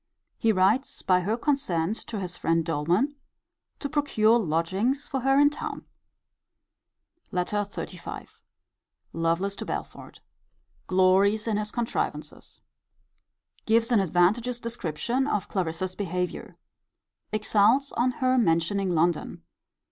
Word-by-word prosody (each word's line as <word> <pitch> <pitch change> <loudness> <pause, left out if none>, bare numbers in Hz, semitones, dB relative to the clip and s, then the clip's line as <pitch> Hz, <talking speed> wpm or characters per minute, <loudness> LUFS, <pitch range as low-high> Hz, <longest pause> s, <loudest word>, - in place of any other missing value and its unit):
He 225 - +3
writes 210 +7 +1
by 185 -1 +4
her 210 +6 -1
consent 215 - 0
to 220 - -4
his 180 -2 -5
friend 165 0 0
Doleman, 175 - 0 0.6
to 285 - -4
procure 240 -7 +3
lodgings 195 - 0
for 270 -3 -2
her 270 +2 +2
in 290 0 +5
town. 295 - -6 1.5
LETTER 180 +3 -1
XXXV. 205 0 -5 0.9
Lovelace 165 +4 0
to - - -5
Belford. - - -6 0.7
Glories 190 +3 +3
in 220 -3 0
his 210 0 -2
contrivances. 235 +1 -4 1.1
Gives 230 +2 +3
an 230 - +5
advantageous 195 +7 +2
description 235 - -2
of 210 -8 -1
Clarissa's 185 0 -2
behaviour. 180 -2 -4 0.8
Exults 215 +5 +3
on 245 +2 +1 0.2
her 255 0 +4
mentioning 185 0 +1
London. 170 0 0
205 Hz, 110 wpm, -26 LUFS, 180-240 Hz, 1.5 s, in